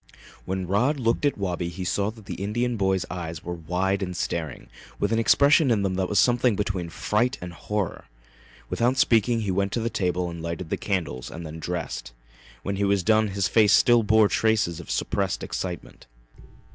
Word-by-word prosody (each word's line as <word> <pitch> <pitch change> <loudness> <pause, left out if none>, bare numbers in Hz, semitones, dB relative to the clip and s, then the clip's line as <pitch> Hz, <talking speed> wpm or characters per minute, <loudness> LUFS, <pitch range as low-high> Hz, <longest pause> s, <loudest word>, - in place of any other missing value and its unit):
When 95 0 -2
Rod 120 - +1
looked 115 +3 +1
at 145 - +1
Wabi 90 -3 -2
he 85 +2 -6
saw 100 +3 0
that 110 -2 -12
the - - -5
Indian 120 +4 -1
boy's 95 -3 +1
eyes 85 -2 -5
were 90 - -4
wide 90 +4 -1
and 90 -2 -3
staring, 80 -6 -3 0.3
with 100 - 0
an 115 - +2
expression 140 +5 +5
in 110 -4 +2
them 95 -1 0
that 95 0 -1
was 105 - 0
something 120 +1 +4
between 95 -4 -2
fright 120 +9 0
and 90 -1 -7
horror. 105 +2 -3 0.6
Without 125 +3 +1
speaking 115 -1 +3
he 100 -3 -1
went 100 +1 0
to - - 0
the 115 +1 -2
table 90 -4 -1
and 85 -1 -7
lighted 85 +1 -5
the - - +2
candles 85 -11 -3
and 85 +1 -8
then 80 +1 -7
dressed. 80 -8 -4 0.5
When 100 0 -2
he 100 - 0
was 100 -2 +2
done 110 +1 +3
his 100 -1 0
face 110 -3 +4
still 120 -1 +6
bore 110 0 +4
traces 105 -7 +1
of 85 - -10
suppressed - - -1
excitement. 90 -8 -6
100 Hz, 195 wpm, -25 LUFS, 90-110 Hz, 0.6 s, still